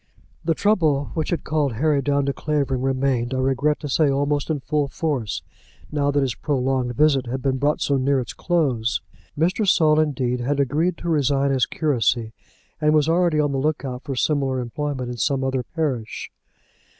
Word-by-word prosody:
The 165 0 +1
trouble 155 -10 +1
which 160 - -2
had 175 - -1
called 150 -4 0
Harry 145 +4 +1
down 140 0 +1
to 140 - 0
Clavering 140 -4 -1
remained, 130 -2 0
I - - -1
regret 135 +3 +1
to 150 - -4
say, 145 +2 +2
almost 145 +2 0
in 155 -2 0
full 145 +1 -1
force 140 -7 -2 0.5
now 145 -1 +1
that 145 0 +2
his 130 -3 -1
prolonged 130 -1 -1
visit 140 -3 +3
had 130 +2 -4
been 130 -1 0
brought 145 +2 +1
so 140 - +2
near 135 +1 +2
its 125 - -5
close. 125 - 0 0.4
Mr. 185 +7 +1
Saul, 155 -3 +4
indeed, 130 -5 0
had 140 +4 -1
agreed 155 +6 +1
to 170 - -4
resign 140 -3 +2
his 130 -2 +2
curacy, 120 -6 0 0.5
and 150 0 +3
was 150 -1 +3
already 170 -1 +2
on 145 -1 +2
the 135 - -1
look 150 +1 -1
out 125 -1 -5
for 135 - -5
similar 135 -1 0
employment 125 +1 -3
in 120 - -6
some 135 +2 0
other 135 -1 0
parish. 130 -5 -3
140 Hz, 185 wpm, -22 LUFS, 130-150 Hz, 0.5 s, Saul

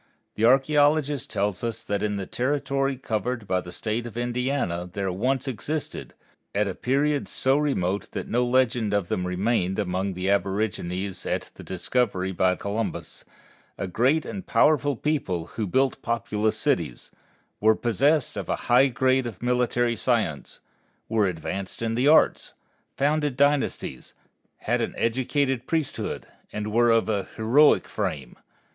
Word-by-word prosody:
The - - -7
archæologist 145 +3 +3
tells 100 -1 -1
us 115 -1 -3
that 100 -1 -2
in 105 -1 -1
the 95 - -3
territory 135 +3 -1
covered 115 -1 -3
by 90 -1 +1
the 90 - -10
State 110 +5 -3
of 115 - -9
Indiana 120 -8 -1
there 95 0 -2
once 130 +8 -1
existed, 140 +5 -4 0.4
at 105 +1 +2
a 95 - -2
period 140 +6 0
so 130 +1 +1
remote 100 -10 0
that - - -4
no 120 +2 +1
legend 120 -4 +2
of 100 -4 -1
them 90 0 -1
remained 95 0 0
among 95 -1 -1
the 90 +1 -3
aborigines 95 -2 -1
at - - -2
the - - -12
discovery 95 -1 -1
by 95 0 +2
Columbus, 105 +4 -4 0.5
a - - -3
great 130 - +2
and 195 -2 -6
powerful 145 -2 +3
people 115 - -1
who 110 -3 -2
built 130 +7 +1
populous 110 -2 -1
cities, - - -1 0.5
were 110 +1 +4
possessed 135 - +1
of - - -5
a - - +2 0.2
high 130 +3 +7
grade 130 +1 +1
of 115 -1 -9
military 120 -1 +1
science, 110 - -1 0.5
were 110 -3 +2
advanced 95 +4 -4
in 115 0 0
the 125 +4 +2
arts, 155 +1 +4 0.4
founded 145 -1 +1
dynasties, 145 0 0 0.5
had - - 0
an - - -3
educated 130 +2 0
priesthood, 160 -4 -2 0.3
and 105 0 -4
were 120 +1 +4
of 115 0 +3
a 105 -3 -1
heroic 125 +7 +4
frame. - - -4
115 Hz, 150 wpm, -25 LUFS, 100-135 Hz, 0.5 s, high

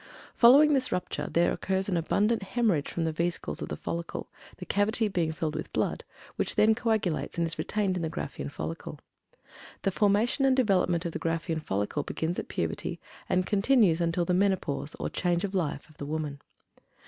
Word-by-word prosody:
Following 285 +6 +7
this 260 -2 +1
rupture 180 - -2
there 170 +1 +3
occurs 190 0 -1
an 190 - 0
abundant 205 +7 +1
hemorrhage 195 - 0
from 170 - -2
the 160 - 0
vesicles 170 +2 -2
of - - -4
the - - -4
follicle, 170 0 -5 0.3
the 180 - -8
cavity 215 +4 +2
being 175 -5 0
filled 155 -1 -3
with 155 0 -5
blood, - - -1 0.3
which - - 0
then 220 +1 +5
coagulates 220 -8 -1
and 170 - +2
is 165 - -4
retained 200 -3 0
in - - -3
the 160 - -1
Graafian 70 - -5
follicle. 80 +3 -6 0.9
The 195 - +2
formation 210 +7 +2
and 265 -1 +4
development 185 -8 +2
of 170 - -2
the - - -4
Graafian 165 0 -1
follicle 105 +4 -1
begins 160 +4 -3
at - - -5
puberty - - -3 0.3
and 185 0 +2
continues 205 -5 +3
until 170 +1 +1
the 180 - +1
menopause 185 - 0
or 75 - -3
"change 175 - 0
of 200 -1 -2
life" 165 -6 -2
of 155 -2 -21
the 145 - -6
woman. 150 -2 -3
180 Hz, 185 wpm, -28 LUFS, 160-205 Hz, 0.9 s, Following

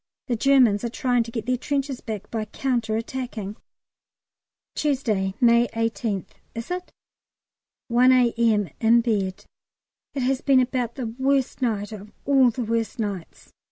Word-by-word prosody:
The 250 -4 -1
Germans 245 -4 +4
are 235 - -1
trying 245 0 +1
to 230 0 -5
get 225 -3 -4
their 250 +1 +1
trenches 275 -1 -2
back 210 -2 -6
by 220 -2 -2
counter 235 -1 -1
attacking. 225 -4 -5 1.2
Tuesday, 220 -10 0
May 235 -1 +5
18th, 225 -3 -1 0.3
is 230 +8 -6
it? 360 0 -4 1.0
1 250 +2 +5
A.M., 230 -6 +3
in 230 +1 +5
bed. 200 -5 -1 0.7
It 270 - -1
has 265 +1 +1
been 270 -2 +4
about 250 -2 -1
the 255 - -4
worst 270 0 +1
night 215 -4 -1
of 210 -1 -9
all 270 -3 +5
the 240 +2 -3
worst 230 +1 -1
nights. 200 -6 -6
235 Hz, 145 wpm, -24 LUFS, 215-255 Hz, 1.2 s, May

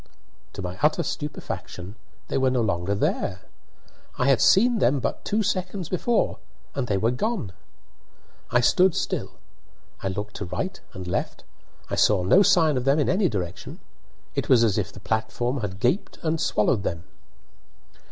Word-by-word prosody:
To 95 - -6
my 90 +1 -5
utter 150 +1 +3
stupefaction, 100 -9 -5 0.3
they - - -1
were 130 0 +3
no 125 -1 +1
longer 100 -2 0
there. 95 -1 -1 0.8
I 125 - +1
had 135 -4 +4
seen 235 +3 +5
them 135 -3 +3
but - - -3
two 215 +1 0
seconds 185 -2 -2
before 225 +6 0 0.3
and 135 -3 -2
they 100 - +1
were 110 +5 +2
gone! 165 - -2 1.0
I 120 0 +3
stood 180 +7 +4
still; - - -2 0.7
I - - -2
looked 105 +2 -4
to 105 - -4
right 90 - -4
and 95 -1 -7
left; 90 - -3 0.4
I - - -7
saw 100 -4 +4
no 140 - +6
sign 170 -8 +4
of 125 - -1
them 135 +3 +3
in 150 - +1
any 190 +1 +2
direction. 90 -5 -5 0.5
It - - -2
was 120 -3 +6
as 110 -2 +2
if 100 - -3
the - - -12
platform 110 +5 -1
had 95 -3 -4
gaped 125 - 0
and 160 0 0
swallowed 105 -5 +2
them. 85 -3 -3
125 Hz, 165 wpm, -25 LUFS, 100-165 Hz, 1.0 s, no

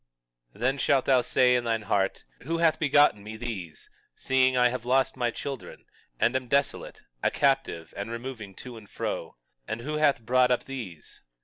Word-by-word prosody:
21:21 - - -17
Then 135 +3 +1
shalt 135 -2 +2
thou 130 -2 +4
say 125 0 +3
in 125 - +1
thine 115 -2 -1
heart: 100 -1 0 0.2
Who 165 +5 -2
hath 165 -1 +3
begotten 145 -8 +4
me 110 +1 -8
these, 100 -9 -6 0.3
seeing 130 0 +2
I 125 0 +5
have 125 -1 -4
lost 130 +2 +2
my 120 -2 0
children, 135 +3 -7 0.3
and 120 +3 +2
am 130 -1 -1
desolate, 140 +2 -1 0.2
a - - +2
captive, 135 - 0
and 100 +2 -5
removing 115 -4 -7
to 125 +3 -9
and 105 -2 -14
fro? - - -4 0.3
And 110 - -4
who 150 +4 -3
hath 140 -6 +2
brought 125 +1 +4
up 125 - +1
these? 110 - -8
125 Hz, 185 wpm, -27 LUFS, 115-135 Hz, 0.3 s, I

